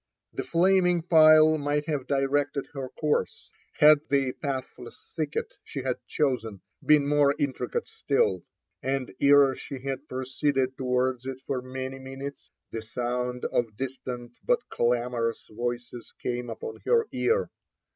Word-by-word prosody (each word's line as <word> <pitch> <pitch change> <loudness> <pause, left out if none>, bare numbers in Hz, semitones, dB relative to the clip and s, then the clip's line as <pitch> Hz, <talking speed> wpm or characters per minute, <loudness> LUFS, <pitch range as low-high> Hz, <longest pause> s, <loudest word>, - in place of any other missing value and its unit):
The - - -3
flaming 180 0 +3
pile 155 -2 +6
might 145 +1 0
have 145 -5 -2
dir^ted 140 +1 0
er 135 -2 -4
course, 150 -1 -1 0.2
had 150 0 +7
the 135 -2 +2
pathless 130 -3 -6
thicket 155 -2 -2
she 135 - -6
had 130 -1 -1
chosen, 115 -9 -1 0.2
been 150 -2 +5
more 145 -1 +4
in 145 -2 -1
tricate 475 - -3
still; 450 +1 0 0.4
and 135 -1 -2
ere 140 -1 +6
she 140 - -7
had 135 +1 -4
proceeded 130 +1 -1
towards 125 -1 0
it 135 -1 -4
for 130 -2 -2
many 130 +1 -6
minutes, 135 +2 -8 0.2
the 115 - -4
sound 125 +2 -3
of 115 -3 -1
distant 125 -2 -5
but - - +1
clamorous 120 -1 0
voices 120 +1 -5
came 125 0 -3
upoB 460 -2 -7
her 465 -1 +3
ear. 470 +2 +1
135 Hz, 135 wpm, -27 LUFS, 125-150 Hz, 0.4 s, had